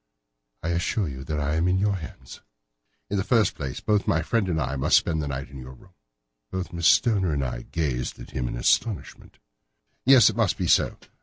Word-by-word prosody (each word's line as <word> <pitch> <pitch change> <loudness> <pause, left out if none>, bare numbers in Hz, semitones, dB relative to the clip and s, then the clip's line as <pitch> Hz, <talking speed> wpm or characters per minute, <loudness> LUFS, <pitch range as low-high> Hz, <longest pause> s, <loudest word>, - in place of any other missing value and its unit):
"I 85 - -2
assure 85 +3 0
you 65 -2 -7
that 75 -1 -3
I 75 +2 -1
am 85 +2 +1
in 90 +1 +2
your 100 +1 +1
hands." 80 -3 -11 0.7
"In 100 - 0
the 95 - 0
first 115 -1 +2
place, 70 -3 -6
both 105 -2 +1
my 80 -1 +2
friend 105 +1 0
and 80 -2 0
I 70 -2 -2
must 65 - +4
spend 80 -1 0
the 75 - -4
night 70 -1 -5
in 70 - -9
your 65 +1 -10
room." 95 +8 -20 0.6
Both 95 +3 -5
Miss 85 -1 +1
Stoner 95 -8 +3
and 70 -1 -1
I - - -4
gazed 70 -7 -2
at - - -11
him 60 -2 -3
in - - -4
astonishment. 100 - -1 0.7
"Yes, 130 -4 +7
it - - +1
must - - +1
be - - -2
so. - - +2
80 Hz, 215 wpm, -25 LUFS, 70-95 Hz, 0.7 s, Yes